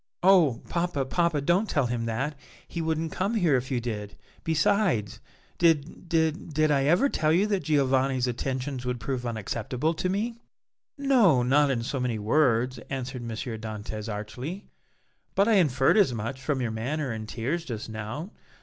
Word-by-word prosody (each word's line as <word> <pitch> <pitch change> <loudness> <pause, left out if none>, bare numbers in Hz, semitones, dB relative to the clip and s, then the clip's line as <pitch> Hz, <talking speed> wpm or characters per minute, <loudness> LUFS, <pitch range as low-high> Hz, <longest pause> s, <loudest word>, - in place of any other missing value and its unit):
"Oh! 175 -10 +5
papa, 170 -5 -1
papa, 170 +1 +1
don't 175 +8 +2
tell 140 -3 +1
him 120 -1 -2
that; 130 +7 -2 0.3
he 170 - -4
wouldn't 160 0 -1
come 200 +5 -1
here 175 -9 +3
if 125 0 -1
you 130 - 0
did; 105 -4 -5 0.3
besides, 155 - +1 0.4
did 165 +1 +1
did 160 -1 0
did 155 0 +3
I 135 -1 +2
ever 175 - +4
tell 155 - +1
you 180 +5 +4
that 200 -3 0
Giovanni's 135 -3 +2
attentions 130 +1 -3
would 125 -1 -2
prove 125 0 -3
unacceptable 120 - -2
to 180 +3 -2
me?" 225 +5 -2 0.6
"No, 235 - +4
not 140 +3 +4
in 120 -4 0
so 135 +3 -3
many 125 -3 -1
words," 125 +2 +2
answered 130 -1 -4
M. 120 - -6
Dantès, 110 -1 -5
archly, 125 - -6 0.7
"but 200 +2 +4
I 225 -3 +5
inferred 135 -1 +3
as 185 - +4
much 115 +5 -4
from 135 -2 -1
your 120 -3 -1
manner 130 +5 -2
and 110 -1 -5
tears 140 +9 -2
just 115 -9 -5
now. 110 - -6
135 Hz, 170 wpm, -27 LUFS, 120-165 Hz, 0.7 s, Oh